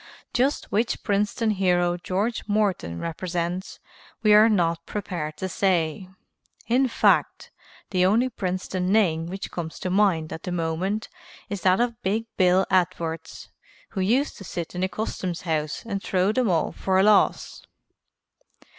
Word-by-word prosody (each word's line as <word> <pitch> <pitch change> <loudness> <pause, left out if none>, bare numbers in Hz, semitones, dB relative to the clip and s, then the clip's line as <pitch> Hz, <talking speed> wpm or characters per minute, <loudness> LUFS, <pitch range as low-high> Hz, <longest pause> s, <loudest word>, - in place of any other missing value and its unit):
Just 265 +3 0
which 225 +3 0
Princeton 210 +2 0
hero 180 -3 +2
George 195 +6 -2
Morton 200 - 0
represents 175 +2 -4 0.4
we 215 -1 +6
are 215 +2 +7
not 170 -5 +1
prepared 170 -7 -4
to 190 - -3
say. 180 -2 0 0.6
In 255 +3 +3
fact, 235 - +1 0.4
the 180 -2 +2
only 220 +7 +3
Princeton 185 -4 -2
name 170 -7 +2
which 190 +3 -6
comes 165 -2 -5
to 185 - -3
mind 185 -5 +2
at 160 - -7
the 180 - -5
moment 175 +5 -2 0.4
is 200 -2 -3
that 185 +2 +3
of 235 -2 -1
Big 215 +4 -1
Bill 185 0 +4
Edwards 170 -3 -1 0.4
who 195 - -3
used 245 +10 +1
to - - -9
sit 170 -2 -5
in 180 - -4
the 185 - +1
Customs 185 -4 -4
House 155 +1 -2
and 200 -3 -3
throw 190 +1 +1
them 240 -1 +1
all 165 -3 +1
for 190 -1 0
a 190 - +5
loss. 210 -1 +2
185 Hz, 150 wpm, -25 LUFS, 175-210 Hz, 0.6 s, are